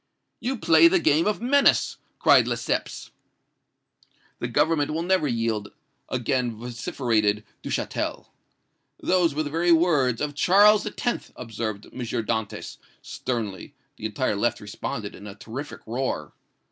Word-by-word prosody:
"'You 260 +2 -2
play 165 -5 +6
the 185 +3 +4
game 160 0 +3
of 210 +2 -1
menace!' 280 +3 +3 0.2
cried - - +5
Lesseps. - - -3 1.3
"'The - - -2
Government 155 -3 +1
will 165 - -1
never 185 -3 +2
yield!' 115 -4 -1 0.4
again 125 -1 -1
vociferated 115 -3 -1 0.2
Duchatel. - - -3 0.7
"'Those 175 -5 +2
were 155 - 0
the 145 - -5
very 170 +2 +2
words 150 -8 +3
of 150 -1 -2
Charles 205 +8 +5
X.!' 240 +3 -3
observed 110 -3 -5
M. - - -12
Dantès, 110 -2 -3 0.3
sternly. 110 -7 -4 0.2
The 110 - -3
entire 110 +1 -1
left 120 +4 0
responded 105 0 -5
in 100 - -11
a 100 - -9
terrific 120 +7 -8
roar. 125 +4 -3
130 Hz, 130 wpm, -25 LUFS, 110-165 Hz, 1.3 s, play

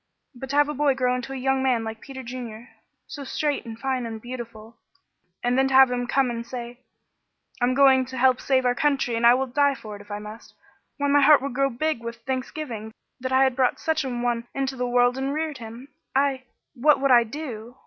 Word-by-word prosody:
But 265 +1 -9
to 280 - -2
have 290 0 +4
a 300 - -3
boy 285 -1 +2
grow 250 -1 +1
into 250 +2 -4
a - - -4
young 265 0 0
man 250 -4 +1
like 220 0 -6
Peter 265 -2 -9
Junior 240 -1 -8 0.4
so 290 - -8
straight 290 +1 -2
and 225 -1 -7
fine 255 -1 -2
and 225 -1 -6
beautiful 230 -2 -9 0.7
and 245 +1 +1
then 270 - +3
to 270 - 0
have 265 -1 +7
him 245 0 -2
come 265 -1 +1
and 230 0 -4
say: 240 0 -8 0.8
'I'm 250 +1 +2
going 265 -1 +5
to 260 0 -7
help 255 0 +3
save 260 -2 +1
our 245 - +3
country 275 -3 0
and 230 - -2
will 265 - 0
die 280 +2 +2
for 215 -4 -9
it - - -13
if 205 - -17
I 205 - -4
must!' 210 +2 -11 0.4
Why, 285 -1 0
my 285 0 +4
heart 295 +1 +7
would 275 - -3
grow 275 +1 +1
big 275 +1 -2
with 235 0 -6
thanksgiving 255 -4 -4 0.3
that 255 +1 -4
I 260 +1 +5
had 265 -2 +2
brought 255 -2 +1
such 320 -1 0
an 245 -2 -3
one 240 -1 -1
into 270 -1 -2
the 250 -1 -2
world 245 +1 +3
and 270 +2 -2
reared 310 -3 -3
him. 230 +3 -10 0.3
I 270 -1 +1 0.3
What 290 +4 +3
would 275 0 +2
I 240 -1 +7
do! 240 -2 -8
255 Hz, 230 wpm, -24 LUFS, 240-275 Hz, 0.8 s, have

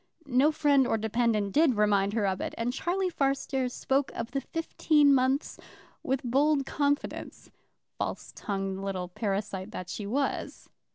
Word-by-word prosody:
No 280 +3 +3
friend 285 -4 +3
or 225 - +1
dependent 220 -2 0
did 300 0 +4
remind 205 -1 +2
her 215 -2 +1
of 190 -1 -1
it, - - -4
and 235 +2 -1
Charlie 365 +6 -1
Fairstairs 270 -3 0
spoke 270 +1 0
of 230 0 -4
the 275 - -1
fifteen 300 -3 +2
months 265 +2 +1 0.4
with 265 0 -1
bold 275 +3 +2
confidence, 285 0 -2 0.5
false - - -4
tongued 195 -2 -3
little 185 -2 -3
parasite 195 0 -3
that 185 -4 -7
she 205 - -5
was. 275 +6 -2
250 Hz, 150 wpm, -28 LUFS, 205-280 Hz, 0.5 s, did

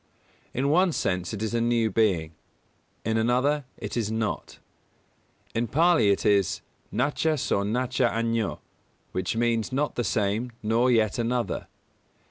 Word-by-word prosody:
In 135 +3 0
one 180 +1 +4
sense 90 -7 -1
it 110 0 -4
is 110 - -2
a 115 - +1
new 115 -2 +2
being; 90 -7 +1 0.7
in 110 +1 +1
another 130 +5 +2
it - - -6
is 110 -3 -1
not. 110 -1 -3 1.0
In 115 +1 0
Pālī 165 -6 +4
it 100 - 0
is 100 -3 +2 0.3
"nacha 150 +4 +1
so 100 - 0
nacha 125 +5 +1
añño" 115 -1 -1 0.5
which 95 +4 -2
means 115 0 +1
not 145 +3 0
the 120 - -1
same 110 +3 0
nor 115 +4 +2
yet 110 -3 +2
another. 120 0 -1
115 Hz, 140 wpm, -26 LUFS, 105-125 Hz, 1.0 s, one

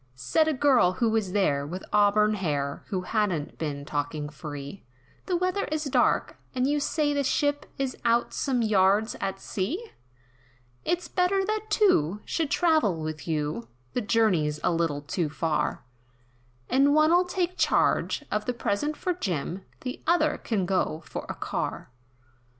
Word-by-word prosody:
Said 310 - +1
a 315 - +2
girl, 255 -9 +4
who 225 +4 +1
was 215 -4 0
there, 150 -8 +2
with 175 +6 -6
auburn 210 +1 +4
hair, 145 -8 -2
Who 190 -4 -2
hadn't 185 -8 -1
been 145 -3 -3
talking 145 0 -3
free, 145 +2 -8 0.4
"The 360 - +1
weather 365 +3 0
is 310 0 -2
dark, 280 - +1 0.2
and 255 0 +1
you 295 +2 +2
say 290 0 0
the 285 -1 +1
ship, 290 +2 0
Is 270 -2 -2
out 235 +1 +2
some 255 -4 0
yards 205 +1 +3
at 195 0 -2
sea, 330 - -3 0.9
"It's 350 -1 -1
better 385 +1 +1
that 430 +1 -2
two, 210 - +3
should 320 -4 -1
travel 310 - +2
with 155 -1 -5
you, 150 -6 -2 0.3
The 250 - 0
journey's 190 -9 +2
a - - +3
little 165 -4 0
too 155 +2 -1
far, 155 0 -1 0.8
And 280 +2 +4
one'll 330 +4 +5
take 360 0 -1
charge 295 - +2
of 210 0 -1
the 250 - -1
present 265 +8 -1
from 360 -2 -2
Jim, 180 - -3 0.2
The 255 0 -5
other, 315 -3 +3
can 205 -6 -1
go 175 -4 0
for - - -6
a - - -3
car." - - -4
215 Hz, 155 wpm, -27 LUFS, -, 0.9 s, one'll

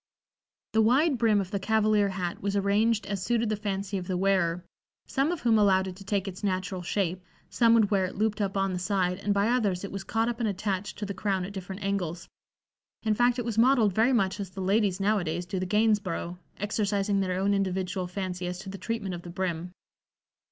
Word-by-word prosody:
The 220 - +4
wide 265 +5 +3
brim 220 -3 +4
of 190 -1 -4
the 200 - -1
cavalier 215 0 +2
hat 180 -2 -4
was 200 0 -1
arranged 205 +2 +2
as 195 -2 -3
suited 235 0 +1
the 215 - +1
fancy 200 -1 -3
of 180 - -8
the 185 - -1
wearer, 180 -2 +1 0.4
some 275 +4 0
of 350 - -3
whom 225 -3 +4
allowed 190 -2 +4
it 185 - -6
to 195 - -11
take 195 0 -1
its 190 +1 -7
natural 185 -1 -1
shape, 180 0 -1 0.3
some 230 -1 +4
would 220 -3 +3
wear 195 -2 +3
it 185 - -6
looped 215 +1 0
up 195 -1 -1
on 195 -1 +1
the 180 - -2
side, 180 -1 0
and 205 +1 -1
by 200 +1 +2
others 210 -7 +1
it 200 - -5
was 195 -1 -5
caught 225 +3 0
up 240 0 -2
and 225 -3 +1
attached 195 0 -3
to 210 - -3
the 200 - -4
crown 190 -1 -1
at 200 - -8
different 190 +1 -7
angles; 180 -4 -2 0.8
in 220 -1 +2
fact, 245 +3 +3
it 245 - -2
was 225 -2 -1
modeled 235 -5 +4
very 225 +6 +3
much 195 -5 +1
as 195 -3 -4
the 195 - -10
ladies 195 0 +2
now 205 +2 +2
a - - -3
days 170 +2 -3
do 185 +1 -3
the 185 - -2
"Gainsborough," 205 -4 0 0.2
exercising 205 -1 0
their 185 -1 -1
own 200 +1 +2
individual 190 -1 -1
fancy 180 -1 -4
as 180 0 -4
to 195 +1 -8
the 195 0 -7
treatment 215 -2 -3
of 175 - -5
the 175 - -10
brim. 175 -1 -3
195 Hz, 230 wpm, -28 LUFS, 185-215 Hz, 0.8 s, The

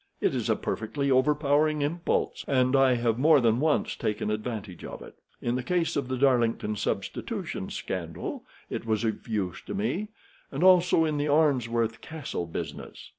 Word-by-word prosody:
It - - +1
is - - -2
a - - +4
perfectly 140 +6 -2
overpowering 150 +2 +3
impulse, 165 +4 -1
and 130 -1 +3
I 135 -2 +5
have 120 -1 0
more 155 +1 +6
than 115 -1 +2
once 155 +1 +1
taken 105 0 -2
advantage 105 -4 -5
of - - -7
it. - - -14 0.2
In 120 - 0
the 130 - -1
case 170 +5 0
of 140 -4 -1
the 130 0 -2
Darlington 120 -5 +2
Substitution - - -3
Scandal 85 -3 -5 0.2
it - - -4
was 110 0 +1
of 110 -2 -2
use 100 -6 -2
to - - -4
me, 205 0 -1 0.4
and - - -2
also 180 -3 +5
in 155 -2 -1
the 145 - 0
Arnsworth 120 -7 +2
Castle 150 - -5
business. 80 - -7
130 Hz, 170 wpm, -27 LUFS, 115-150 Hz, 0.4 s, more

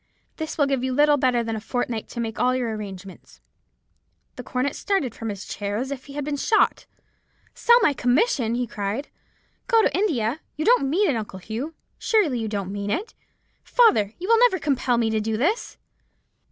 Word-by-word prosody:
This 315 -1 -5
will 290 - +4
give 270 -2 -1
you 260 0 -1
little 295 +2 +4
better 250 -3 +2
than 225 -1 -3
a 215 - -5
fortnight 235 -1 -3
to 235 - -7
make 225 -2 -3
all 255 0 +2
your 240 -3 -1
arrangements." 195 -2 -9 1.0
"The - - -6
young - - -16
cornet 255 +3 0
started 385 - -1
from 225 -1 -5
his 200 0 -6
chair 205 0 -4
as 260 +4 -3
if 265 -2 -6
he 280 - -11
had 290 -1 -4
been 290 -1 -2
shot. 430 +9 +2 0.7
"'Sell 475 0 +5
my 295 - +4
commission!' 250 - +1
he 245 0 -1
cried; 210 +5 -4 0.6
'go 455 -2 +4
to - - +1
India! 285 - 0 0.2
You 310 - -3
don't 470 - +4
mean 385 +8 +2
it, - - -1
Uncle 210 -4 -5
Hugh; 230 - -6 0.2
surely 350 - +2
you 225 - -2
don't 200 -3 -3
mean 200 0 -4
it. 395 - -2 0.5
Father, 230 - +3
you 365 - -6
will 455 0 +5
never 485 -5 +5
compel 265 -6 0
me 225 -1 +1
to 220 - +1
do 220 0 -1
this.' 355 - -1
255 Hz, 200 wpm, -24 LUFS, 220-310 Hz, 1.0 s, Sell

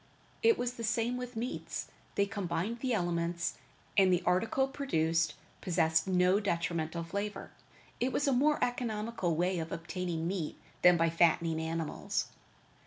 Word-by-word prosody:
It 455 0 +5
was 245 0 -1
the 235 - -7
same 230 +2 +1
with 250 -1 -5
meats; 235 +3 -4 0.3
they 200 - +3
combined 200 +2 -2
the 255 +1 -1
elements, 175 -4 -1 0.4
and 190 -2 +5
the 180 0 +2
article 220 +9 +2
produced 165 - 0 0.3
possessed 160 -2 +2
no 185 +1 +4
detrimental 170 -4 -1
flavor. 200 +5 -4 0.5
It 255 +2 +1
was 290 - 0
a 275 - +4
more 295 +4 +3
economical 225 -7 -1
way 180 +2 +1
of 160 0 -4
obtaining 165 0 -3
meat 175 -4 -3 0.2
than 180 -1 +7
by 165 0 +2
fattening 165 -1 +3
animals. 160 -1 -2
180 Hz, 145 wpm, -32 LUFS, 165-230 Hz, 0.5 s, than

